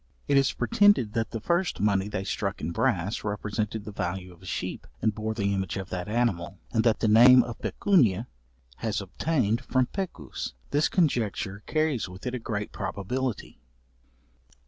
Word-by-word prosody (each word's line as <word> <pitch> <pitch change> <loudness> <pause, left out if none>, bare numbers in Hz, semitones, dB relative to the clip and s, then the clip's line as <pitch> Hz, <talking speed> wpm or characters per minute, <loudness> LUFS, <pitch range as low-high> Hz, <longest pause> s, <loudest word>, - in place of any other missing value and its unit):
It 145 - +3
is 135 -1 +4
pretended 125 - +3
that 115 -1 -1
the 115 - -4
first 175 - 0
money 100 -1 +2
they 95 -2 -3
struck 100 0 -2
in 80 - -3
brass, 100 -1 0
represented 105 0 -3
the 105 - -6
value 90 -1 -4
of 85 - -20
a 95 - -12
sheep, - - -4
and 110 -1 +1
bore 110 +1 -3
the 100 -2 0
image 95 -1 -2
of 95 0 -6
that 90 +1 -3
animal, 100 -5 0
and 110 -2 +2
that 115 -2 +2
the 115 - +3
name 120 +4 +8
of 120 -2 -7
pecunia 120 - +2 0.5
has 110 -2 -1
obtained 115 - 0
from 130 0 +2
pecus. 105 - -5 0.2
This 145 +2 +2
conjecture 110 - 0
carries 155 - 0
with 95 +2 -11
it 125 - -2
a 125 - -2
great 105 -2 -4
probability. 105 +5 -3
110 Hz, 170 wpm, -27 LUFS, 100-125 Hz, 0.5 s, name